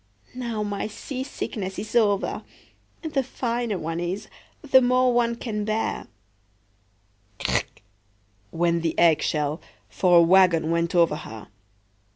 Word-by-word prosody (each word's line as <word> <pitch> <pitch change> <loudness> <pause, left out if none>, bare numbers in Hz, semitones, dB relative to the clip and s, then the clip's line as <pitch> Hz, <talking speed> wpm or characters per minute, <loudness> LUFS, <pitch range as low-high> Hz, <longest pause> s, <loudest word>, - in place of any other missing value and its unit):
Now 235 -4 -3
my 205 0 -3
seasickness 220 -5 -5
is 215 - -6
over. 205 -4 +2 0.6
The 310 -4 0
finer 240 -4 -2
one 165 0 -4
is, 175 +3 -4 0.3
the 265 -3 +5
more 250 0 +3
one 235 -1 +2
can 215 -3 -4
bear.""Crack!" 100 - -6 0.7
went 170 0 0
the 165 -1 -2
egg 165 -3 +5
shell, 150 +1 -1 0.3
for 180 -2 +3
a - - +8
wagon 170 -2 +4
went 170 +2 0
over 170 -3 +3
her. 110 -6 -10
180 Hz, 120 wpm, -24 LUFS, 155-235 Hz, 0.7 s, a